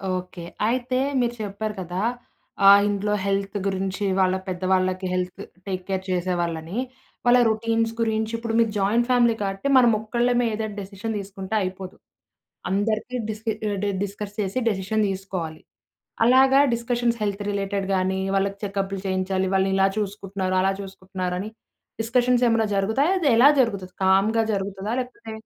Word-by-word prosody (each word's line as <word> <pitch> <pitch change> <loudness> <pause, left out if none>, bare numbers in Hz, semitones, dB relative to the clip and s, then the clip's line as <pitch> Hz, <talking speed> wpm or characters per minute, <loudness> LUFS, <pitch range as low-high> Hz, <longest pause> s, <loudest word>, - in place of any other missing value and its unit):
Okay. 180 -1 -6 0.2
అయితే, 255 +2 0 0.2
మీరు 240 -1 0
చెప్పారు 210 +1 -4
కదా! 180 +1 -4 0.7
ఆహ్, 200 0 +9
ఇంట్లో 205 0 -1
హెల్త్ 195 +1 -1
గురించి. 195 +1 -2
వాళ్ళ 185 0 +3
పెద్దవాళ్ళకి 185 0 0
హెల్త్ 180 0 -3 0.3
టేక్ 185 -1 -3
కేర్ 190 -1 -1
చేసేవాళ్ళని, 175 0 -2 0.5
వాళ్ళ 245 +1 +6
రొటీన్స్ 225 +1 0
గురించి. 220 -1 0
ఇప్పుడు 230 -1 -4
మీకు 225 -2 +3
జాయింట్ 225 +5 +2
ఫ్యామిలీ 240 -2 +4
కాట్టి 195 +5 -3
మనమొక్కళ్ళమే 240 +1 +2
ఏదో 220 +1 -2
డిసిషన్ 200 +3 -5
తీసుకుంటే 195 +1 -6
అయిపోదు. 185 0 -5 0.8
అందరికీ 215 +5 -1
డిస్క్ 215 +1 -4 0.2
ఆహ్, 200 - -2
డ్ - - +1 0.2
డిస్కర్స్ 205 +1 -6
చేసి 200 +5 -1
డెసిషన్ 210 +1 0
తీసుకోవాలి. 185 -5 -5 0.6
అలాగా 265 +2 +6
డిస్కషన్స్ 235 0 0
హెల్త్ 205 -1 -2
రిలేటెడ్ 200 -1 -2
గానీ, 190 +1 0 0.2
వాళ్ళకి 195 0 0
చెకప్లు 195 -1 -2
చేయించాలి, 190 0 0
వాళ్ళనిలా 190 0 +3
చూసుకుంటున్నారు, 195 -2 -3
అలా 195 +1 +2
చూసుకుంటున్నారని 185 0 -5 0.5
డిస్కషన్సేమన్నా 240 -1 +2
జరుగుతాయా? 220 - +2
అదెలా 275 -4 +6
జరుగుతది? 195 -6 -2
కామ్‌గా 200 +4 +3
జరుగుతదా, 195 +1 -3
లేకపోతే 245 -3 -9
200 Hz, 130 wpm, -24 LUFS, 190-225 Hz, 0.8 s, ఆహ్